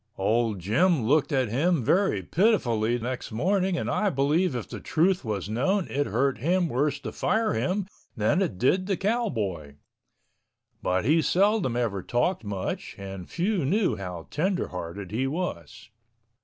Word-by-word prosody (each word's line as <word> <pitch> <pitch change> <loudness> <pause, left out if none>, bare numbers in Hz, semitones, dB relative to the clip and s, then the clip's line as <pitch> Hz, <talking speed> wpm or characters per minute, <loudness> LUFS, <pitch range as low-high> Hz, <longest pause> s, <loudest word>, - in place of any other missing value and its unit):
Old 110 +2 +1
Jim 130 - +2
looked 145 +7 +2
at 130 -5 +1
him 150 +5 +1
very 175 - +2
pitifully 120 - +2
next 125 +1 -5
morning 185 - +1
and - - -2
I 210 - +1
believe 150 +2 +1
if 120 - -4
the - - -7
truth 180 +4 +1
was 105 -4 -3
known 155 - 0
it 145 +1 0
hurt 130 +5 0
him 175 +6 +1
worse 145 +1 0
to 115 -5 -5
fire 220 0 0
him 180 - -1 0.3
that 110 - +2
it 170 - -1
did 185 - +2
the 195 -3 0
cowboy. 115 - -2 1.1
But 95 +2 0
he 160 +5 +4
seldom 190 - +2
ever 115 -6 -1
talked 125 - 0
much 100 -3 -4
and 95 -2 -8
few 185 0 0
knew 185 - +1
how 90 -4 -6
tenderhearted 100 - -3
he 125 +5 0
was. 140 - -5
135 Hz, 155 wpm, -26 LUFS, -, 1.1 s, he